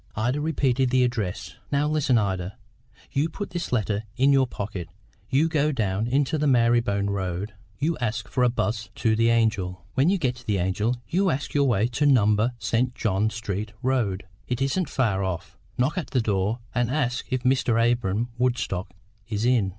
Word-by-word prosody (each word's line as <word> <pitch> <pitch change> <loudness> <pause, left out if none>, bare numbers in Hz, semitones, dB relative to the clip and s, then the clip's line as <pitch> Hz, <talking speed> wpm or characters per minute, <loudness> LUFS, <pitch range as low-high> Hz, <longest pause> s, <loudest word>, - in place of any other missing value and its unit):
Ida 125 +7 0
repeated 135 -4 +1
the 130 0 +3
address. 110 -7 -3
"Now, 145 +1 +2
listen, 150 -5 +2
Ida. 95 -1 -2 0.5
You 145 +4 +1
put 205 +5 -6
this 175 -1 -4
letter 110 -3 0
in 135 +2 +4
your 135 -1 +4
pocket; 100 -7 -5 0.4
you 145 +5 +3
go 155 -2 +1
down 110 -4 -1
into 140 +4 +1
the 150 - +1
Mary'bone 115 -5 +2
road; 95 +1 -3 0.2
you 160 +1 -1
ask 120 -2 -2
for 125 - 0
a 125 - +5
'bus 110 -2 -2
to 110 -1 +1
the 115 +1 +3
Angel. 100 -7 +1
When 140 +6 +3
you 195 - +3
get 125 -7 -1
to 125 - -15
the 105 -2 +1
Angel, 95 +6 0
you 190 +2 +2
ask 145 -2 -2
your 140 -1 +3
way 110 -4 +2
to 140 +5 +1
Number, 110 -2 +3
St. 120 +2 0
John 105 0 +1
Street 105 -2 -4
Road; 120 -8 0 0.2
it 125 -1 -2
isn't 140 +4 0
far 105 -7 +1
off. 95 -3 -4 0.2
Knock 140 +8 +1
at 170 - -5
the 130 - +1
door, 105 0 0 0.2
and 120 -1 +1
ask 125 -3 -1
if 130 -1 -1
Mr. 125 -3 +2
Abra'm 115 -1 +1
Woodstock 120 -7 0 0.4
is 105 0 -1
in. 120 -6 +3
120 Hz, 185 wpm, -25 LUFS, 105-135 Hz, 0.5 s, a